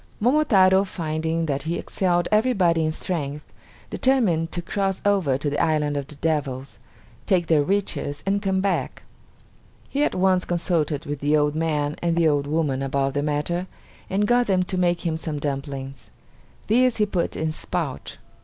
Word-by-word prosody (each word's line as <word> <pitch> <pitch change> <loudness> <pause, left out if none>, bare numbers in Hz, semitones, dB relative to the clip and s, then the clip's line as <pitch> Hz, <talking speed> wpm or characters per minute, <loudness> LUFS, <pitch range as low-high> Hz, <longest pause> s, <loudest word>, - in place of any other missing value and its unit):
Momotaro 205 -7 +4
finding 165 -2 -2
that 140 -3 -1
he 165 +2 -2
excelled 175 -2 0
everybody 200 -8 +3
in 155 - +1
strength, 150 -3 -5 0.4
determined 195 -12 +2
to 175 - -2
cross 195 +2 -1
over 190 -10 +2
to 145 - -3
the 145 0 0
island 150 -2 +1
of 140 -1 -3
the 150 - -10
devils, 140 -4 -2 0.5
take 180 -3 +3
their 160 -2 +3
riches, 150 -4 -2
and 200 +1 +1
come 190 -2 0
back. 195 -1 -2 0.9
He 285 +1 0
at - - 0
once 185 0 +3
consulted 165 -3 -1
with 145 -1 -4
the 145 +2 +2
old 150 0 +2
man 150 -2 -1
and 170 -1 +1
the 170 -1 +3
old 145 -2 +1
woman 145 -3 0
about 135 0 0
the 145 - 0
matter, 150 +5 -1 0.4
and 200 +2 +1
got 245 +2 +3
them 185 -2 +2
to 185 - -4
make 175 -1 +1
him 160 -1 0
some 160 -2 -4
dumplings. 135 -2 -5 0.6
These 250 +3 +3
he 210 - +3
put 185 -4 -2
in 160 - -2
his 155 0 -3
pouch. 165 -7 -4
165 Hz, 175 wpm, -23 LUFS, 145-190 Hz, 0.9 s, Momotaro